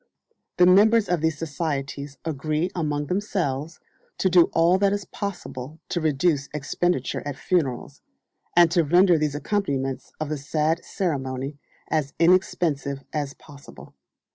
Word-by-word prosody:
The 180 - +6
members 210 +4 +5
of 175 -3 0
these 160 -1 0
societies 145 -3 -4
agree 155 +3 -1
among 150 -3 -1
themselves 165 -5 -2 0.4
to 190 - +1
do 175 -1 +7
all 170 +3 +3
that 200 0 +3
is 205 -1 -3
possible 160 - -6
to 175 - -1
reduce 150 -1 +1
expenditure 150 0 -1
at 145 -2 -5
funerals, 145 -10 -1 0.5
and 170 -1 +6
to 170 -1 +3
render 175 +2 +4
the 150 -1 0
accompaniments 140 -6 -2
of 155 -1 -3
the 155 -2 -3
sad 155 +4 0
ceremony 140 -6 -3 0.3
as 150 -3 -1
inexpensive 165 -6 +1
as 145 -2 -3
possible. 145 -2 -14
155 Hz, 135 wpm, -24 LUFS, 140-180 Hz, 0.5 s, do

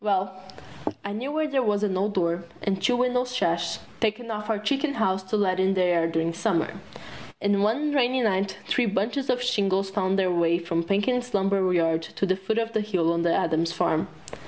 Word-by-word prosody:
Well, 195 -2 0 0.7
I 200 - -3
knew 250 +7 -4
where 310 +1 0
there 275 -3 +1
was 210 -3 +1
an 195 -3 0
old 200 +2 -1
door 170 -1 0 0.2
and 195 -2 -1
two 245 - +2
window 250 0 +2
sash 175 -10 -1 0.2
taken 230 +1 -1
off 210 0 -5
our 220 - +1
chicken 280 +7 -1
house 190 -4 +1
to 200 +3 -1
let 185 -2 +1
in 190 +1 +2
the 185 - +3
air 170 -2 +2
during 165 0 -1
Summer. 170 -2 -1 0.6
And 200 0 +1
one 280 +9 +1
rainy 260 -2 +2
night 195 -2 0
three 245 -2 +2
bunches 225 +7 -1
of 250 0 +1
shingles 195 -5 +1
found 195 -1 0
their 185 -2 +2
way 170 -1 +2
from 170 -1 -1
Perkins' 245 +6 0
lumber 195 -1 +2
yard 165 -2 +2 0.2
to - - +1
the 185 -1 +2
foot 195 +4 -2
of 230 0 -1
the 220 - +1
hill 180 -6 +1
on 170 - 0
the 170 0 +2
Adams 165 0 +1
Farm. 160 -1 +1
200 Hz, 205 wpm, -25 LUFS, 180-230 Hz, 0.7 s, the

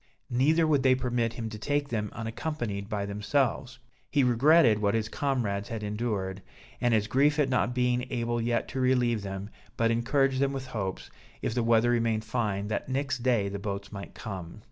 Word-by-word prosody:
Neither 150 +7 +3
would 150 -3 +3
they 130 -1 +5
permit 120 -3 -1
him 115 -2 -4
to 110 -1 -8
take 145 +4 -1
them 105 -3 -2
unaccompanied 115 -3 -4
by 105 -3 -2
themselves; 120 +5 -1 0.3
he 145 -2 +3
regretted 125 -1 +5
what 100 0 +1
his 110 -1 0
comrades 110 -6 -1
had 115 -2 -4
endured, 105 -3 -2 0.4
and 120 - +3
his 105 -1 +2
grief 140 +7 +3
at 145 -3 +2
not 125 -1 +1
being 125 0 +1
able 120 -1 -1
yet 120 0 0
to 135 - -4
relieve 125 -3 +2
them, 100 +1 -6 0.3
but 115 0 +2
encouraged 130 +3 +2
them 140 0 +1
with 135 -1 -4
hopes, 100 -6 -4 0.3
if - - -1
the 120 - +1
weather 115 +1 +3
remained 115 -2 +1
fine, 105 -4 -1
that 110 - -3
next 135 0 -1
day 120 -5 +2
the 100 0 -4
boats 100 -1 -5
might 100 -1 -8
come. 95 -4 -7
115 Hz, 190 wpm, -28 LUFS, 105-130 Hz, 0.4 s, they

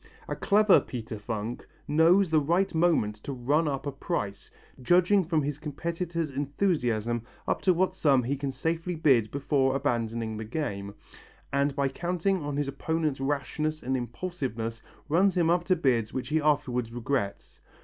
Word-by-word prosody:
A - - -3
clever 210 -1 +5
Peter 115 -3 -6
Funk 110 +2 -5 0.2
knows 165 +4 +4
the 155 - +5
right 175 +7 +1
moment 160 -11 +2
to 125 - -7
run 145 +6 +1
up 140 -1 -2
a 145 - -2
price, 130 - -4 0.3
judging 180 +7 +4
from 160 -3 0
his 145 +1 -3
competitor's 165 +1 -3
enthusiasm 130 - 0 0.3
up - - 0
to 185 - +4
what 185 +1 +1
sum 140 -8 +3
he 135 +4 -1
can 140 0 -3
safely 165 +6 -2
bid 130 -9 +3
before 135 -1 +1
abandoning 115 -5 -1
the 110 - -4
game, 100 -6 -4 0.6
and 140 0 +1
by 140 -1 +1
counting 180 +5 -1
on 145 -1 -3
his 145 -1 0
opponent's 155 +1 -1
rashness 145 +3 -2
and 130 +1 0
impulsiveness 120 -3 -4 0.3
runs 185 +5 +3
him 170 -1 +3
up 175 0 +1
to 185 - +3
bids 120 -9 +1
which 125 -1 -4
he 155 +1 +2
afterwards 125 -6 +1
regrets. 120 -3 -3
145 Hz, 160 wpm, -28 LUFS, 120-165 Hz, 0.6 s, clever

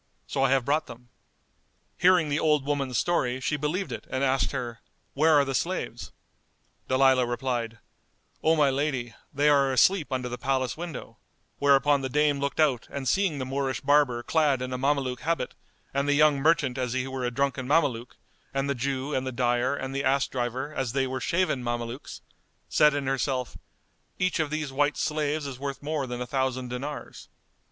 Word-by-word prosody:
So 135 - -2
I 135 - +4
have 135 -2 +2
brought 150 +3 +1
them." 120 +1 -12 0.9
Hearing 175 -3 +4
the 145 +2 0
old 150 -3 +2
woman's 140 -4 -1
story 130 -4 +1
she 150 - -1
believed 155 +7 -2
it - - -6
and 130 +1 -1
asked 135 0 +1
her, 120 -4 -4 0.3
"Where 155 +2 +4
are 145 -1 +5
the 135 - -3
slaves?" - - -3 0.8
Dalilah 130 -1 +4
replied, 120 -2 -2 0.6
"O 160 +1 +3
my 145 -3 +3
lady, 135 -4 -2 0.2
they 145 +2 +1
are 140 -2 +4
asleep 155 +4 +3
under 130 -1 -2
the 125 0 -6
palace 130 -1 0
window"; 170 -3 -7 0.4
whereupon 140 0 +4
the 130 - -3
dame 145 +1 +2
looked 140 +2 -3
out 140 -7 +2
and 140 -2 -5
seeing 190 -4 +1
the 130 - -3
Moorish 135 0 -2
barber 140 -4 +3
clad 150 -4 +2
in 130 0 -4
a - - -2
Mameluke 135 -2 0
habit 165 -1 -1 0.4
and 140 +1 0
the 145 - +3
young 150 -1 +4
merchant 145 -4 +2
as 125 -2 -1
he 130 0 -1
were 130 -1 -4
a 125 - +1
drunken 130 0 -1
Mameluke[FN#204] 140 -6 +2 0.5
and 135 0 0
the 140 - +1
Jew 135 +2 -2
and 130 0 -1
the - - -2
dyer 120 +2 +1
and 135 -1 -5
the 140 +1 -2
ass 135 0 +2
driver 130 +3 -3
as 130 -5 -2
they 135 -1 +1
were 130 0 -4
shaven 170 -4 0
Mamelukes, 120 +2 -5 0.5
said 150 -1 +4
in 145 -1 -2
herself, 130 -1 -1 0.6
"Each 185 -2 0
of 155 -2 0
these 155 -2 -3
white 145 +2 +1
slaves 150 -1 -1
is 135 -3 -6
worth 140 0 -5
more 150 -2 -2
than 125 0 -5
a - - -2
thousand 130 -1 -2
dinars." 140 +4 -6
135 Hz, 190 wpm, -27 LUFS, 130-145 Hz, 0.9 s, are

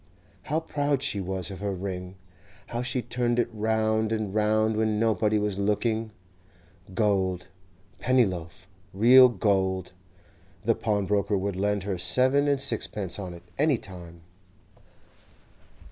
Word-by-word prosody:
How 155 +2 -1
proud 145 -3 -1
she 100 -7 0
was 95 -1 -3
of 95 - -8
her 100 -1 -2
ring! 90 0 -6 0.5
How 120 - -4
she 125 0 -1
turned 120 +1 -1
it 120 - +2
round 110 0 0
and 110 -3 -2
round 110 +1 +2
when 110 -1 0
nobody 110 -1 +2
was 105 -2 -1
looking! 110 +2 0 0.9
Gold, 95 -4 0 0.5
Pennyloaf, 95 -9 0 0.3
real 125 +5 +8
gold! 95 -4 0 0.7
The - - +4
pawnbroker 100 -1 0
would 100 0 -2
lend 100 +1 0
her 95 -3 -3
seven 130 +8 +3
and 140 -1 +2
sixpence 105 -7 -1
on 90 -3 -6
it, 85 - -13 0.2
any 150 -3 +3
time. 85 -4 -11
105 Hz, 130 wpm, -26 LUFS, 95-115 Hz, 0.9 s, real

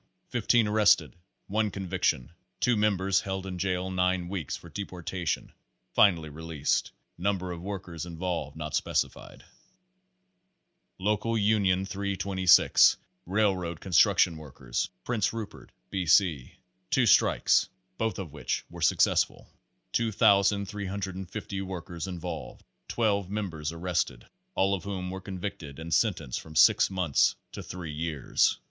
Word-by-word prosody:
Fifteen 115 -3 +2
arrested, 105 0 +3 0.3
one 105 +1 0
conviction, 95 -9 -1 0.3
two 125 - +3
members 100 -3 +2
held 95 0 -4
in 90 -2 -5
jail 95 0 -1
nine 90 -1 0
weeks 90 -7 -3
for - - -13
deportation 90 -3 -4 0.4
finally 85 -6 +4
released. 75 -1 -1 0.3
Number 90 -1 -1
of 85 -1 -6
workers 90 -4 -6
involved 85 -4 -4
not 75 -2 -5
specified. - - -2 1.5
Local 105 +4 0
Union 100 -3 +2
326, 95 -2 +4 0.3
Railroad 95 -4 0
Construction 90 -2 +4
Workers, 65 -5 -4
Prince 115 -5 0
Rupert, 110 -3 -7 0.2
B. 95 -3 -2
C. 80 -7 +3 0.3
Two 130 +3 +3
strikes, 110 - +4 0.3
both 110 0 -1
of 95 -7 -6
which 75 - -3
were - - -9
successful; - - +2 0.4
2,350 100 -2 0
workers 90 -2 -6
involved; 90 -1 -6 0.2
12 100 -5 0
members 90 -7 -3
arrest 85 +1 -1
ed, - - -16 0.3
all 95 +1 +2
of 95 - -2
whom 95 -2 -4
were 95 0 -6
convicted 90 -7 -6
and 80 +1 -5
sentenced 80 - 0
from 80 -1 -13
six - - +6
months 90 -7 +2 0.2
to - - -7
three 85 -4 -7
years. 80 -2 +1
95 Hz, 120 wpm, -28 LUFS, 85-100 Hz, 1.5 s, six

